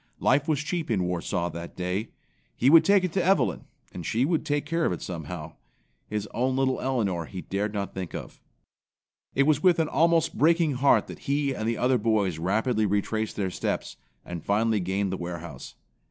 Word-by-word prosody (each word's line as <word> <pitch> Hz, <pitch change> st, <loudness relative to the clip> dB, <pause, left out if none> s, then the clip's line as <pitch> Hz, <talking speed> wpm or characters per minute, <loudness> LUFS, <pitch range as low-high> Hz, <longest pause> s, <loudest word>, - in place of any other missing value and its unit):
Life 140 Hz, +3 st, +2 dB
was 150 Hz, -3 st, +1 dB
cheap 165 Hz, +1 st, -3 dB
in 100 Hz, -6 st, +1 dB
Warsaw 90 Hz, 0 st, -2 dB
that 85 Hz, +1 st, -8 dB
day. 90 Hz, +5 st, -2 dB, 0.5 s
He 130 Hz, -, +3 dB
would 165 Hz, 0 st, +8 dB
take 200 Hz, -1 st, +4 dB
it 180 Hz, -3 st, -2 dB
to 185 Hz, -, +1 dB
Evelyn 140 Hz, -, +2 dB, 0.3 s
and 90 Hz, -, -7 dB
she 115 Hz, -, +1 dB
would 165 Hz, +1 st, 0 dB
take 145 Hz, 0 st, 0 dB
care 165 Hz, +2 st, -1 dB
of -, -, +2 dB
it 90 Hz, -, -4 dB
somehow. 80 Hz, -2 st, -6 dB, 0.5 s
His 105 Hz, -1 st, -3 dB
own 130 Hz, +2 st, 0 dB
little 130 Hz, -1 st, +1 dB
Elinor 105 Hz, -10 st, -1 dB
he 95 Hz, +1 st, -7 dB
dared 100 Hz, +2 st, -2 dB
not 100 Hz, -2 st, -4 dB
think 95 Hz, -3 st, -5 dB
of. -, -, -8 dB, 0.9 s
It 140 Hz, -, +4 dB
was 150 Hz, 0 st, +2 dB
with 180 Hz, -1 st, +5 dB
an 160 Hz, -2 st, +1 dB
almost 165 Hz, +2 st, +2 dB
breaking 165 Hz, 0 st, +3 dB
heart 135 Hz, +1 st, +3 dB
that -, -, -10 dB
he 140 Hz, -1 st, +1 dB
and 110 Hz, -2 st, -2 dB
the 115 Hz, -, -1 dB
other 125 Hz, 0 st, +2 dB
boys 105 Hz, -6 st, +1 dB
rapidly 110 Hz, +5 st, +1 dB
retraced 105 Hz, +2 st, -1 dB
their 95 Hz, -3 st, -2 dB
steps -, -, -3 dB, 0.3 s
and 85 Hz, -2 st, -6 dB
finally 110 Hz, +1 st, +2 dB
gained 95 Hz, +1 st, -1 dB
the 95 Hz, -, -2 dB
warehouse. 85 Hz, -5 st, -7 dB
110 Hz, 195 wpm, -26 LUFS, 95-145 Hz, 0.9 s, would